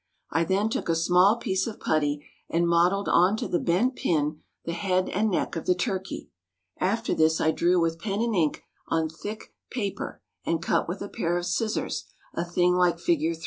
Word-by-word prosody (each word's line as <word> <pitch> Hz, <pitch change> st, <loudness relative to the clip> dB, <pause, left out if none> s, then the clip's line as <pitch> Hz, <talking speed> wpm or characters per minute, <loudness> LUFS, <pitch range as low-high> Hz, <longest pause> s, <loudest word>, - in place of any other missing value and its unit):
I 165 Hz, +2 st, +2 dB
then 195 Hz, +5 st, +1 dB
took 220 Hz, -, -3 dB
a 165 Hz, -, +3 dB
small 180 Hz, +5 st, +5 dB
piece 190 Hz, -3 st, -1 dB
of 220 Hz, -, -6 dB
putty, 145 Hz, -2 st, 0 dB, 0.2 s
and 170 Hz, +1 st, +2 dB
modelled 175 Hz, +4 st, +3 dB
on 185 Hz, +5 st, +4 dB
to -, -, -3 dB
the 175 Hz, -, 0 dB
bent 215 Hz, +10 st, +1 dB
pin 150 Hz, -2 st, 0 dB, 0.2 s
the 170 Hz, -, -2 dB
head 185 Hz, 0 st, 0 dB
and 215 Hz, +3 st, +1 dB
neck 180 Hz, -, -1 dB
of 165 Hz, -, -5 dB
the 180 Hz, -, +4 dB
turkey. 190 Hz, +1 st, -3 dB, 0.5 s
After 225 Hz, +5 st, 0 dB
this 160 Hz, 0 st, +3 dB
I 160 Hz, -, +3 dB
drew 175 Hz, +2 st, +2 dB
with 165 Hz, -1 st, 0 dB
pen 200 Hz, +2 st, -2 dB
and 230 Hz, 0 st, 0 dB
ink 160 Hz, -5 st, +1 dB, 0.2 s
on 160 Hz, -1 st, 0 dB
thick 205 Hz, +7 st, -8 dB, 0.2 s
paper, 205 Hz, -6 st, -4 dB, 0.2 s
and 165 Hz, -, 0 dB
cut 170 Hz, -, 0 dB
with 180 Hz, +4 st, -4 dB
a -, -, -5 dB
pair 175 Hz, -3 st, -1 dB
of 175 Hz, -, -2 dB
scissors, 215 Hz, +5 st, -1 dB, 0.3 s
a 170 Hz, -, -1 dB
thing 175 Hz, +1 st, +2 dB
like 180 Hz, -1 st, +3 dB
Fig. 165 Hz, -1 st, +1 dB
175 Hz, 195 wpm, -26 LUFS, 165-195 Hz, 0.5 s, small